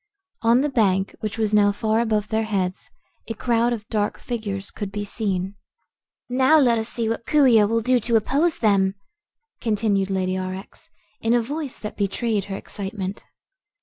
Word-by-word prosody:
On 230 +3 +4
the 295 - +1
bank, 195 -7 +1
which 215 0 -4
was 215 -1 0
now 205 -1 +5
far 220 +2 0
above 215 -3 0
their 220 0 0
heads, 190 -4 -2 0.4
a 225 - -4
crowd 235 +1 +1
of 215 -3 -4
dark 210 -2 -1
figures 205 -5 -4
could 205 -2 -5
be 205 0 -3
seen. 195 -3 -2 0.7
"Now 260 +5 +4
let 240 -6 +4
us 220 +1 -3
see 230 -2 -2
what 230 +1 -3
Coo 295 -2 +4
ee 230 -4 +6
oh 205 - +4
will 230 +1 +1
do 250 +2 +3
to 235 +1 0
oppose 280 +9 +2
them," 195 -3 +2 0.6
continued 205 -3 0
Lady 185 -1 0
Aurex, 185 +1 -7 0.3
in 230 +1 +2
a 240 - +3
voice 285 +2 -4
that 210 - -7
betrayed 205 +1 -1
her 195 - -5
excitement. 195 0 -6
220 Hz, 180 wpm, -23 LUFS, 200-235 Hz, 0.7 s, ee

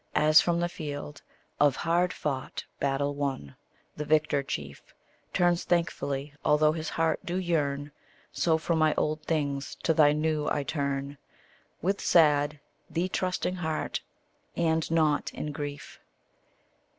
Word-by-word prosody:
As 155 +1 +6
from 170 -1 +1
the 175 - +1
field 145 -3 -6 0.4
Of 145 -2 +4
hard 175 +2 +1
fought 135 -3 -4
battle 140 +1 0
won, 135 - -3 0.4
the 150 - -3
victor 150 -1 +2
chief 70 - -5 0.5
Turns 175 -1 +2
thankfully, 145 -5 -1
although 150 +1 +4
his 155 0 -4
heart 165 -1 +1
do 175 - -3
yearn, 145 -6 -1 0.4
So 160 -2 +2
from 160 +1 0
my 155 -1 +3
old 155 0 0
things 145 -3 -2
to 165 - +3
thy 150 -2 +6
new 155 0 0
I 145 - 0
turn, 140 -1 -3 0.6
With 195 +3 0
sad, 150 -2 +4 0.3
thee 175 +2 -1
trusting 185 0 -1
heart, 160 -3 -2 0.5
and 160 -1 +1
not 155 -3 +2
in 150 - -4
grief. 145 -1 -7
155 Hz, 135 wpm, -28 LUFS, 145-165 Hz, 0.6 s, As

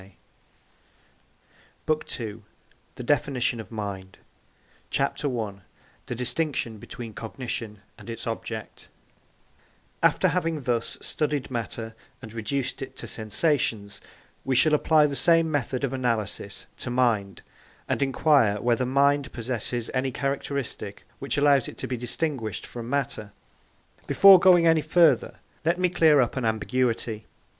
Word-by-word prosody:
] - - -34
BOOK 155 -3 -2
II 110 -1 -6 0.5
THE - - -7
DEFINITION 125 -2 +1
OF 110 - -8
MIND 100 -4 -6 0.7
CHAPTER 140 +1 -1
I 100 -3 -4 0.5
THE 125 - -3
DISTINCTION 125 -3 -1
BETWEEN 115 +1 -8
COGNITION 115 -2 -5 0.2
AND - - -11
ITS 115 0 -6
OBJECT 115 -1 -6 1.1
After - - +3
having 165 -4 -1
thus 120 -2 0
studied 145 -3 -2
matter 115 -1 -4 0.3
and 115 -3 -11
reduced 125 +4 -3
it - - -7
to - - -6
sensations, 110 -3 0 0.4
we 135 - 0
shall 150 +5 +4
apply 150 0 +4
the 145 -1 -1
same 165 +1 +4
method 135 -2 -1
of 135 -1 -1
analysis 120 -5 -2
to - - -5
mind, 115 -7 0 0.4
and - - -1
inquire 135 -6 +3
whether 120 +2 +1
mind 140 0 +2
possesses 120 0 -3
any 130 0 0
characteristic 135 -6 -3 0.2
which 140 - -3
allows 140 -3 +4
it - - -9
to - - -4
be 130 - -2
distinguished 120 -1 -3
from 120 -1 -8
matter. 135 -7 -2 0.7
Before 195 -1 +8
going 175 -2 +6
any 165 -1 +5
further, 155 -4 +3 0.3
let 170 +2 +2
me 180 0 +2
clear 160 -4 +5
up 125 - -1
an 130 - -1
ambiguity. 115 -1 -1
125 Hz, 135 wpm, -26 LUFS, 115-145 Hz, 1.1 s, Before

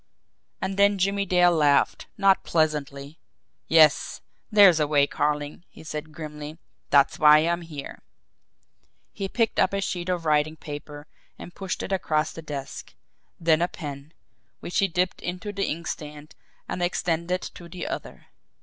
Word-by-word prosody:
And 190 -1 -3
then 200 0 +4
Jimmie 200 +1 0
Dale 180 -1 +4
laughed 150 -4 +2
not 195 -1 +4
pleasantly. 150 -2 -1 0.5
"Yes, 155 -3 +4 0.3
there's 200 -6 +7
a 150 - +2
way, 145 -1 +4
Carling," 150 +2 -2
he - - -14
said 155 0 -6
grimly. 150 0 -8 0.3
"That's 140 -1 +4
why 150 -1 +8
I'm 170 +1 0
here." 150 -4 -9 1.1
He 195 -1 -4
picked 230 0 0
up - - +3
a 200 - 0
sheet 180 -2 -3
of 175 -2 -2
writing 155 0 +2
paper 145 -1 -9 0.3
and 175 - -10
pushed 190 -2 -4
it - - -6
across 155 -5 0
the 165 - -9
desk 140 -3 -7 0.4
then 165 -1 +3
a 175 - +2
pen, 145 -4 -8 0.5
which 175 - -2
he 195 - +3
dipped 180 +1 -1
into 180 +4 -5
the 195 0 -1
inkstand, 150 -2 -6 0.3
and 180 - -4
extended 175 0 -1
to 170 -1 -12
the 180 +1 -6
other. 330 +3 -6
165 Hz, 150 wpm, -25 LUFS, 150-180 Hz, 1.1 s, why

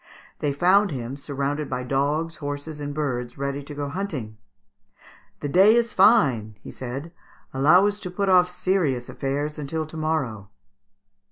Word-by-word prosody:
They 145 - 0
found 185 +8 +4
him, 130 -3 -5
surrounded 140 +1 -3
by 125 - -3
dogs, 145 +5 -1
horses, 145 +1 -5
and 145 0 -4
birds, 125 -5 -3
ready 140 +1 -3
to 145 +1 -9
go 145 0 -3
hunting. 140 - -5 1.0
"The 145 - -2
day 195 +8 +6
is 235 -1 +1
fine," 135 - +4
he - - -10
said; 135 +6 -6 0.4
"allow 155 +9 +5
us 205 0 0
to 185 - -6
put 195 +3 -2
off 180 -1 +5
serious 180 -9 0
affairs 145 +3 -3
until 155 +2 -3
to 155 +1 -10
morrow." 135 -11 -2
145 Hz, 155 wpm, -24 LUFS, 135-180 Hz, 1.0 s, day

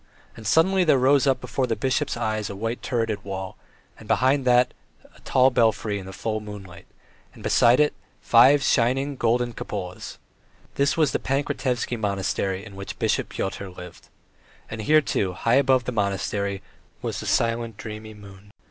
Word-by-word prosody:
And 110 - -8
suddenly 185 - +3
there 155 -5 +4
rose 135 +2 +3
up 130 -1 +2
before 125 +1 -2
the 115 - 0
bishop's 135 +2 -1
eyes 110 -2 -2
a 100 - -6
white 115 +4 -4
turreted 115 -4 -2
wall, 95 -1 -6 0.4
and - - -13
behind 130 +1 +2
it 125 0 +4 0.4
a - - -18
tall 130 0 +3
belfry 110 -3 +1
in 95 - -9
the - - -7
full 110 +2 -3
moonlight, 100 -4 -10 0.5
and - - -13
beside 120 +3 +4
it 150 0 +3 0.3
five 130 +4 +5
shining, 135 +3 +1
golden 120 0 0
cupolas: 90 -5 -6 0.6
this 140 +2 +1
was 155 -4 +3
the - - -1
Pankratievsky 130 -3 -2
Monastery, 100 -1 -2
in 100 -3 -11
which 100 0 -7
Bishop - - 0
Pyotr 95 0 -4
lived. 90 -1 -12 0.6
And 110 0 -5
here, 155 +7 +4
too, 100 -8 -1
high 115 +7 +2
above 130 -2 +2
the 125 - -3
monastery, 100 -2 -2 0.4
was - - -3
the - - -6
silent, 115 -1 0
dreamy 110 0 -8
moon. 100 -1 -14
115 Hz, 165 wpm, -24 LUFS, 100-130 Hz, 0.6 s, five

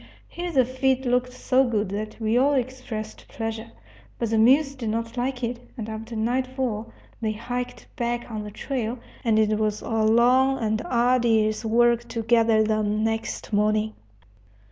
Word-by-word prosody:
Here 350 0 -5
the 260 -5 +4
feed 260 +1 0
looked 250 0 +1
so 255 +1 +2
good 215 -5 0
that 215 +3 -5
we 220 0 0
all 280 +3 +4
expressed 250 -4 -4
pleasure. 225 0 -5 0.5
But 230 -2 -2
the 225 - +3
mules 275 +5 +5
did 245 -5 -4
not 230 +2 -3
like 250 +1 -2
it, 235 +1 -2 0.2
and 220 -2 -5
after 225 +1 -6
nightfall 240 -1 -1 0.3
they 215 -1 0
hiked 245 +3 -5
back 240 0 -2
on 215 -1 -4
the 210 - -6
trail, 240 +2 -3 0.3
and 225 -3 +2
it 215 0 +2
was 215 -1 0
a - - -6
long 240 +4 +4
and 220 -2 -1
arduous 235 -3 +2
work 235 +1 +3
to 230 -1 -4
gather 225 -1 +4
them 215 0 0
next 225 0 -3
morning. 215 +1 +2
230 Hz, 165 wpm, -25 LUFS, 220-250 Hz, 0.5 s, mules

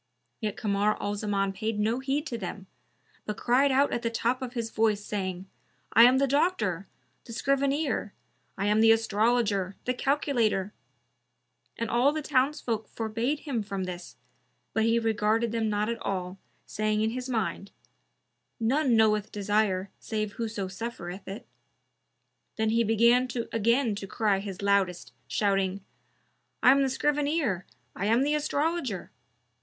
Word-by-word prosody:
Yet 215 -3 -3
Kamar 205 0 +1
al 205 - -2
Zaman 200 -2 -1
paid 215 +2 -3
no 220 +4 +1
heed 275 +3 -1
to 250 - -4
them, 190 0 -6 0.6
but 210 - -3
cried 265 +3 +3
out 275 +2 +3
at 240 - -1
the 230 - 0
top 235 +3 -1
of 250 -2 -5
his 230 -3 -3
voice, 215 -2 +1
saying, 190 -3 -3 0.5
"I 230 - +9
am 255 +2 +5
the 275 - +3
Doctor, 235 - 0 0.4
the 230 - -10
Scrivener! 275 -2 0 0.5
I 195 - -1
am 210 +1 +3
the 225 0 +7
Astrologer, 215 -3 +1
the 250 - +1
Calculator!" 245 -7 0 1.0
And 230 - -2
all 245 +5 +3
the 310 0 -3
townsfolk 260 -5 0
forbade 230 +6 -2
him 265 -7 -2
from 195 -2 -4
this, 180 -1 -7 0.6
but 220 0 +2
he 230 +1 +3
regarded 225 0 +1
them 225 -1 0
not 210 0 0
at 235 0 -3
all, 185 -1 -3 0.3
saying 215 0 -1
in 220 +1 +1
his 255 +2 -5
mind, 200 -4 -2 0.9
"None 255 +2 +2
knoweth 215 -2 +3
desire 205 -2 0
save 215 -2 -3
whoso 215 -3 -4
suffereth 190 -2 -7
it." 205 +6 -7 1.1
Then 220 0 +1
he 230 +1 +3
began 235 +3 +4 0.3
again 230 +2 +2
to 195 - -6
cry 205 -2 +1
his 195 -1 -7
loudest, 200 -3 +1
shouting, 195 -1 0 0.8
"I 255 - +8
am 275 +1 +4
the 270 - +2
Scrivener, 290 - 0 0.3
I 200 - -2
am 230 +4 +3
the 295 +1 +1
Astrologer!" 300 - -1
225 Hz, 150 wpm, -28 LUFS, 200-250 Hz, 1.1 s, I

